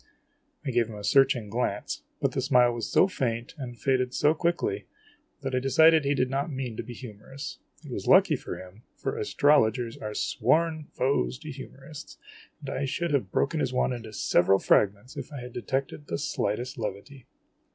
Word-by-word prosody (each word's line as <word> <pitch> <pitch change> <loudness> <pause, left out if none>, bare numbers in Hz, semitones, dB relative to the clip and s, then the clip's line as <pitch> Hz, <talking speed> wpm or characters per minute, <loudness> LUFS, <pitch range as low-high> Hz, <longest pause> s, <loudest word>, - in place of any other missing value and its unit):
I 135 - -1
gave 120 -2 +2
him 110 - -8
a 105 - -8
searching 135 -1 +3
glance; 105 -2 -2 0.2
but - - +1
the - - -1
smile 125 -2 +4
was 115 -1 -4
so 185 - +5
faint, 120 -10 -2
and 120 -3 -6
faded 130 -2 +1
so 150 +1 +4
quickly, 160 - -1 0.6
that 135 -1 -3
I 130 - +2
decided 160 +4 +5
he 140 +1 +2
did 130 -1 +2
not 140 +4 -2
mean 130 -4 -4
to - - -2
be 120 - -9
humorous. 125 +4 -8 0.3
It - - -9
was - - -5
lucky - - +6
for - - -6
him, 95 +4 -12
for - - -3
astrologers 125 - +2
are 105 -1 -5
sworn 160 -1 +1
foes 135 -1 0
to 155 -1 -7
humorists; 135 +2 -10 0.4
and - - -5
I 140 - -1
should 170 +5 -2
have 140 -3 0
broken 155 +3 +1
his 130 -3 -1
wand 125 0 +1
into 115 -3 -7
several 95 -2 +3
fragments 100 +5 +1
if - - -6
I 145 - -6
had 125 0 -9
detected 135 +4 -3
the - - -2
slightest 125 -1 -2
levity. 115 +5 -6
130 Hz, 185 wpm, -27 LUFS, 115-140 Hz, 0.6 s, lucky